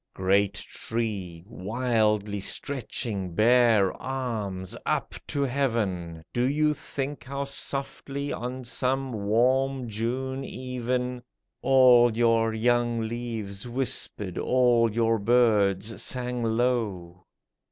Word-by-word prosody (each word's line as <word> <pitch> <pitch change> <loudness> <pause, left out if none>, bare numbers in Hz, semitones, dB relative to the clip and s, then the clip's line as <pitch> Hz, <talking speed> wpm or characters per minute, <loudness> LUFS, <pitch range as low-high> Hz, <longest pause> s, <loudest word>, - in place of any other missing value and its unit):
Great 100 +1 +2
tree, 100 -7 -4
wildly 105 -1 0
stretching 105 -6 -3
bare 115 -3 +4
arms 110 -8 -4
up - - -1
to 140 - -1
heaven, 105 -12 -1
Do 125 +2 +1
you 150 +1 +2
think 140 0 -5
how 140 +1 -4
softly, 140 0 -3
on 125 +2 -5
some 130 +2 -1
warm 125 +5 +1
June 130 +5 -2
even, 125 -1 -3 0.4
All 125 -3 +6
your 115 -1 +3
young 120 +1 +1
leaves 110 -2 -5
whispered, 120 -6 -2
all 120 -3 +3
your 115 0 +1
birds 105 -2 +2
sang 125 -1 -2
low. 110 -7 -1
120 Hz, 100 wpm, -27 LUFS, 105-130 Hz, 0.4 s, All